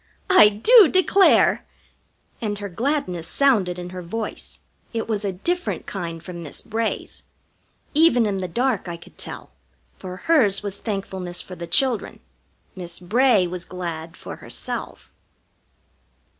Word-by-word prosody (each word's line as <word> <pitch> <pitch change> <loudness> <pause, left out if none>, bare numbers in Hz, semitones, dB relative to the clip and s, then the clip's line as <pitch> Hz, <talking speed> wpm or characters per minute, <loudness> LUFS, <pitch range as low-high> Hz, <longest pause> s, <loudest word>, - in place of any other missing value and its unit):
I 365 - +8
do 390 - +7
declare!" 375 +3 +4 0.8
And 210 -2 -2
her 205 0 -5
gladness 185 - -2
sounded 210 -11 +2
in 180 0 -7
her 185 0 -6
voice. 215 +6 -5 0.3
It 225 -1 -2
was 215 -2 -1
a 200 - -1
different 345 - -2
kind 170 -4 -5
from 175 -1 -8
Miss 150 -4 -8
Bray's. 225 0 -3 0.7
Even 290 -7 +5
in 200 -2 -1
the 185 - -3
dark 235 +2 0
I 170 -1 -5
could 170 - -17
tell, - - -7 0.5
for 185 -1 -7
hers 215 - +3
was 200 -1 -5
thankfulness 190 -4 -4
for 185 - -6
the 170 -1 -7
children. 250 +5 +1 0.6
Miss 175 -2 -6
Bray 215 +2 +3
was 175 0 -5
glad 170 -2 -6
for - - -8
herself. - - -5
200 Hz, 140 wpm, -23 LUFS, 180-240 Hz, 0.8 s, I